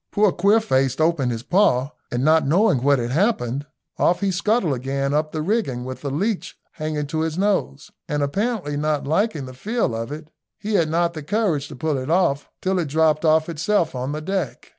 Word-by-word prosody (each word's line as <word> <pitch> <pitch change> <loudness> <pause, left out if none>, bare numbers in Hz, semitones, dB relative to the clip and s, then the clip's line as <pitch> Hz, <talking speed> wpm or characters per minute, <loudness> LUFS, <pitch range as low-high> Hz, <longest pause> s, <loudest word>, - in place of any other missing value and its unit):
Poor 205 -1 +3
Queerface 175 - +2
opened 155 -6 +2
his 115 -1 -4
paw, 145 -5 +2 0.2
and 120 +1 -1
not 155 -2 +4
knowing 170 - +3
what 140 +1 +4
had 120 -1 -2
happened, 145 - 0 0.3
off 175 +2 +2
he 200 -1 +1
scuttled 195 - +1
again 135 +2 -2
up 155 +1 0
the 155 -1 -3
rigging 155 - -1
with 130 0 -7
the 140 - -3
leech 190 +9 -2
hanging 155 -2 -3
to 155 +2 -3
his 160 0 -1
nose, 190 - -1 0.2
and 145 -1 0
apparently 195 0 -1
not 150 0 -1
liking 160 -1 0
the 130 - -9
feel 215 - -1
of 115 +3 -4
it, 155 +1 -8 0.3
he 215 +1 -4
had 165 -6 +2
not 170 +1 +1
the 155 - -6
courage 165 -4 0
to - - -10
pull 150 +1 -1
it 130 +3 -5
off 165 -5 +1
till 190 0 +1
it 170 - 0
dropped 155 +1 +2
off 160 0 +3
itself 170 +2 0
on 130 +2 -3
the 150 +1 -4
deck. 190 +2 -3
155 Hz, 205 wpm, -22 LUFS, 140-190 Hz, 0.3 s, not